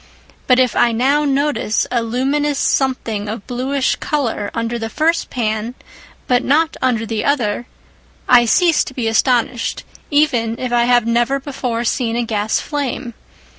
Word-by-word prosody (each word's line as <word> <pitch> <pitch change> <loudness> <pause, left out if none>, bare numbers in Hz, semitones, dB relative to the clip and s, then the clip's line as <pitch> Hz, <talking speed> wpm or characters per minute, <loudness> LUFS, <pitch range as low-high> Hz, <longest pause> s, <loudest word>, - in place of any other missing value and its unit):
But 255 - +5
if 255 -1 +2
I 240 - +3
now 275 +6 +2
notice 280 -5 0
a 240 -2 +1
luminous 275 +5 0
something 230 -8 -1
of 215 -1 -6
bluish 260 +2 -1
colour 240 -8 -2
under 230 0 -2
the 225 0 -4
first 325 +6 0
pan 225 0 -2 0.5
but 250 0 +2
not 315 +3 +2
under 240 -3 +1
the 220 -1 -3
other, 240 -4 0 0.6
I 240 -1 +6
cease 335 - +3
to 265 - -9
be 240 -3 -2
astonished, 235 +1 0 0.3
even 250 -7 +1
if 250 -2 -3
I 240 0 +3
have 245 -2 +3
never 240 +4 +1
before 255 -4 -3
seen 235 -1 0
a 240 - 0
gas 215 -1 0
flame. 275 -4 -4
245 Hz, 155 wpm, -18 LUFS, 230-275 Hz, 0.6 s, I